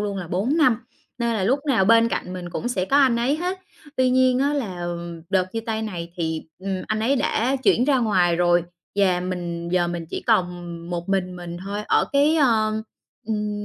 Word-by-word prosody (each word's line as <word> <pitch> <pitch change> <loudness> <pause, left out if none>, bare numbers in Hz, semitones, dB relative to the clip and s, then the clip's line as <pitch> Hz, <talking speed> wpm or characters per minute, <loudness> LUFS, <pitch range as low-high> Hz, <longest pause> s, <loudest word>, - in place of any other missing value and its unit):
luôn 205 -1 -2
là 180 -4 -5
4 215 - 0
năm, 255 -8 +4 0.4
nên 235 -1 0
là 195 - 0
lúc 255 +8 +2
nào 225 -8 +3
bên 230 +2 +5
cạnh 180 -5 -3
mình 180 -1 -6
cũng 240 - -3
sẽ 185 -7 -1
có 275 - +2
anh 265 -4 +5
ấy 250 +5 +1
hết. 360 +3 -2 0.4
Tuy 255 -1 +3
nhiên 255 0 +4
á 280 +2 +2
là, 190 -11 -3
ừm, 170 -1 -5
đợt 185 -1 +1
chia 225 - -2
tay 220 -1 -3
này 170 -5 -5
thì, 160 -2 -2 0.2
ừm, 190 0 -3
anh 215 0 -1
ấy 260 +6 +2
đã 255 +1 +1
chuyển 255 -1 +3
ra 275 -2 +3
ngoài 180 -7 +2
rồi, 175 0 +3 0.3
và 185 -3 +3
mình 175 -2 -4
giờ 175 -1 +1
mình 170 -1 -4
chỉ - - -4
còn 175 -1 +1 0.3
một 175 0 -4
mình 185 -2 -1
mình 175 -1 -7
thôi 205 +1 -3
ở - - +3
cái 290 +3 +4
ơ, 220 -6 +2 0.4
ừm, 210 -1 -2
205 Hz, 215 wpm, -23 LUFS, 175-245 Hz, 0.4 s, bên